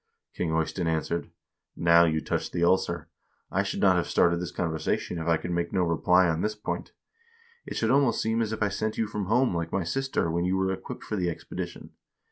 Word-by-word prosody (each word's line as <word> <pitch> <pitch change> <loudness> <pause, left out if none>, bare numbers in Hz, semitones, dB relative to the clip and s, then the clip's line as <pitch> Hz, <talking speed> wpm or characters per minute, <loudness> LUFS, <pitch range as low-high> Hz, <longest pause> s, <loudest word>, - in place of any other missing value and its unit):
King 90 - -2
Eystein 80 +2 -1
answered: 80 +1 -1 0.3
' - - -61
Now 85 0 +5
you 80 -1 +1
touched - - -3
the 85 - 0
ulcer. 85 -2 +1 0.4
I - - +2
should - - -3
not 95 -2 +5
have 85 - 0
started 85 0 +3
this 90 - -3
conversation 80 +1 -2
if 80 - -4
I 85 -1 +4
could 90 - -5
make 85 0 -1
no 95 -2 +2
reply 90 +2 +3
on 80 0 0
this 105 0 -1
point. 105 - -5 0.7
It - - -5
should 115 +1 +1
almost 135 -3 +3
seem 110 +1 +1
as 110 -1 -1
if 110 -1 -1
I 105 - +2
sent 110 +2 -2
you 115 - +1
from 105 -1 -4
home 120 0 +2
like 85 -1 -2
my 95 - 0
sister 135 -2 -1
when 85 +1 0
you 90 +1 +1
were 95 0 +1
equipped - - -7
for 105 - -3
the 90 -2 0
expedition.' 85 - -6
90 Hz, 225 wpm, -27 LUFS, 85-105 Hz, 0.7 s, Now